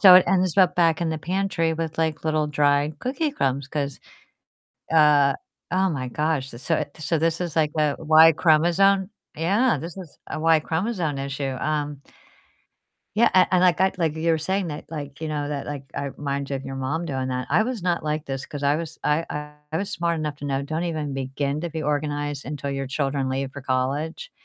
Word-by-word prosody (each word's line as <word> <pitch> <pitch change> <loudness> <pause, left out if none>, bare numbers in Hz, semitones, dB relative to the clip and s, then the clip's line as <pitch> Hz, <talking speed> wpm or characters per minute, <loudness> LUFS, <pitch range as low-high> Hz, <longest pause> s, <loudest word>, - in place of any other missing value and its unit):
So 185 -3 +10
it 185 - +6
ends 185 -1 +2
up 180 -1 +5
back 165 -2 +3
in 170 - 0
the 160 - -1
pantry 180 -1 0
with, 160 -1 -4
like, 160 -1 -1
little 155 -1 +1
dry 145 0 +2
cookie 280 +4 -1
crumbs 135 - -1
'cause, 140 -2 -3 0.9
uh 150 -3 +5 0.4
Oh 190 0 +3
my 130 -5 -3
gosh. 150 0 -1
So, 130 +8 -1
eh 155 - 0 0.2
so 155 +2 0
this 165 +2 0
is, 170 -3 -3
like, 155 -2 +2
a 150 -2 +2
Y 160 +1 +7
chromosome 175 +5 +3 0.3
Yeah, 200 - +2
this 165 +5 -7
is 180 -6 -10
a - - -3
Y 160 0 +4
chromosome 165 -3 -1
issue. 135 -1 -3
Um 150 -2 -2 1.1
Yeah, 230 +2 +5
a 185 -1 +6
and 180 - +4
like, 180 -2 +4
I 190 0 +4
like 160 -2 +1
you 165 +1 +1
were 160 - +2
saying 190 +3 -1
that, 150 - -6
like, 145 -2 -7
you 160 - -2
know, 150 -1 -2
that, 145 -1 -4
like, 145 -2 -5
it 140 -1 -3
reminds 140 -1 -3
you 140 - -1
of 135 - -6
your 135 0 -5
mom 145 +6 -2
doing 130 -4 -2
that. 125 0 -2
I - - +5
was 230 -4 -3
not 175 -2 0
like 155 0 -2
this 135 -1 -4
'cause 145 -1 -6
I 140 +1 +3
was 165 -1 -5
I 150 -1 -1 0.2
I 160 - 0
was 200 +2 -3
smart 170 -3 0
enough 150 -2 -3
to 145 - -7
know 135 0 -1
don't 160 +4 -3
even 155 -5 -2
begin 140 +2 -2
to 170 - -3
be 160 0 -4
organized 145 -1 -2
until 140 0 -4
your 135 -1 -3
children 135 -1 -1
leave 135 0 -2
for 145 - -8
college. 140 - -2
155 Hz, 210 wpm, -24 LUFS, 140-170 Hz, 1.1 s, So